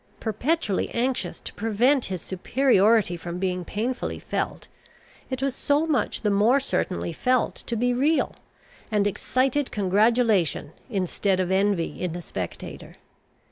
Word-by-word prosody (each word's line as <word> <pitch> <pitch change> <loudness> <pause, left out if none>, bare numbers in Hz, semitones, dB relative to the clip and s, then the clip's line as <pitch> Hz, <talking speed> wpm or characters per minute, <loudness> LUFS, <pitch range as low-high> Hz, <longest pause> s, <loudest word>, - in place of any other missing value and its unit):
Perpetually 225 - 0
anxious 250 +2 -1
to - - -7
prevent 235 +5 +2
his 185 -3 -5
superiority 215 -1 +3
from 170 +1 -6
being 180 -1 -1
painfully 235 +8 -3
felt, - - -3 0.6
it 260 0 -3
was 275 -1 +1
so 290 +3 +1
much 290 -9 0
the 210 - +1
more 215 +7 +4
certainly 185 -10 -2
felt 250 +8 +1
to 235 - -5
be 245 +2 +1
real, 290 +6 +1 0.6
and 210 -2 +2
excited 255 +7 0
congratulation 205 -5 +2 0.2
instead 195 -2 0
of 185 0 0
envy 190 -3 +1
in 180 -3 -2
the 175 - -5
spectator. 90 - -7
215 Hz, 135 wpm, -25 LUFS, 185-255 Hz, 0.6 s, more